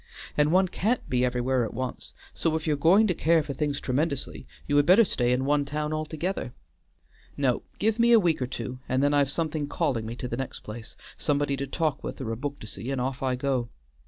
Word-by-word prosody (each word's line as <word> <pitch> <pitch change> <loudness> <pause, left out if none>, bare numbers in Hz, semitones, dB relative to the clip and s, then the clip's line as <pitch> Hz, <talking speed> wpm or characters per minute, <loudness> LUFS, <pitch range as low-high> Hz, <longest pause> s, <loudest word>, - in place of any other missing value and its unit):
And 150 +1 +3
one 185 +2 +4
can't 215 +7 -1
be 125 0 +1
everywhere 125 0 +1
at 115 - -5
once, 130 +1 -5 0.2
so 160 -1 0
if 160 - -2
you're 155 -2 +2
going 175 +9 +5
to 190 - +2
care 165 -1 +3
for 145 - -5
things 145 +1 -1
tremendously, 130 - -2 0.2
you 145 - 0
had 145 0 +4
better 205 +5 +7
stay 125 -8 +1
in 130 +1 +1
one 145 +1 +2
town 150 +2 -3
altogether. 155 -2 -3 0.8
No, 130 -4 +1 0.2
give 220 +2 +1
me 235 +1 +5
a 230 - +8
week 170 -7 +1
or 125 - 0
two, 125 0 -5
and 130 +2 +2
then 145 0 +3
I've 140 -2 +3
something 155 -1 -1
calling 135 -9 -1
me 115 - -5
to 125 - -5
the 120 - -4
next 135 -1 -5
place; 110 +1 -9 0.2
somebody 145 -1 +1
to 140 +1 -4
talk 155 0 -1
with - - -5
or 120 -4 -3
a - - -1
book 140 +4 -4
to - - -7
see, 110 +3 -6
and 135 -1 -1
off 130 +1 -2
I 130 -1 +1
go. 125 -2 -1
140 Hz, 230 wpm, -27 LUFS, 125-160 Hz, 0.8 s, a